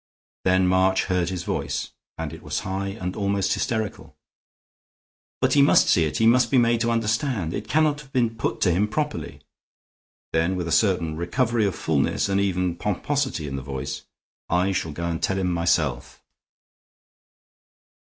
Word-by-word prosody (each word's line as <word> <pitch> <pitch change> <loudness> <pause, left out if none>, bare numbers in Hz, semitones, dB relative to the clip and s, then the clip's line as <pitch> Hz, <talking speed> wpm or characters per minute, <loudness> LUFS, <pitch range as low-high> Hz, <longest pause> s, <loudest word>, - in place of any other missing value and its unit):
Then 95 0 +4
March 95 +1 +3
heard 90 -2 0
his 90 -2 -4
voice, - - -3 0.3
and - - -4
it - - -10
was - - -3
high 95 +1 -3
and 95 -2 -5
almost 100 -1 0
hysterical: 110 -3 -3 1.3
"But - - +2
he 145 - +5
must 140 - +5
see 80 - +4
it; 75 - -2
he 115 - +2
must 120 +1 +5
be 130 - +3
made 120 -1 +3
to 120 - +1
understand. 115 - 0
It - - -5
cannot 150 -1 +2
have 135 -2 -17
been 120 -4 +1
put 115 - -3
to 90 - +4
him 95 +5 +2
properly." 150 +7 -3 0.9
Then, 80 +3 +1
with 90 -2 -3
a - - -3
certain 85 -7 +2
recovery 110 +5 +1
of 95 - -3
fullness - - 0
and 100 0 +2
even 90 -3 0
pomposity 105 - -1
in 70 -1 -4
the - - -4
voice, 65 0 -5 0.5
"I 90 +3 +2
shall 80 -4 -2
go 85 +3 -5
and 85 -1 -2
tell 95 - 0
him 90 -2 0
myself." 80 -7 -1
95 Hz, 170 wpm, -24 LUFS, 85-115 Hz, 1.3 s, he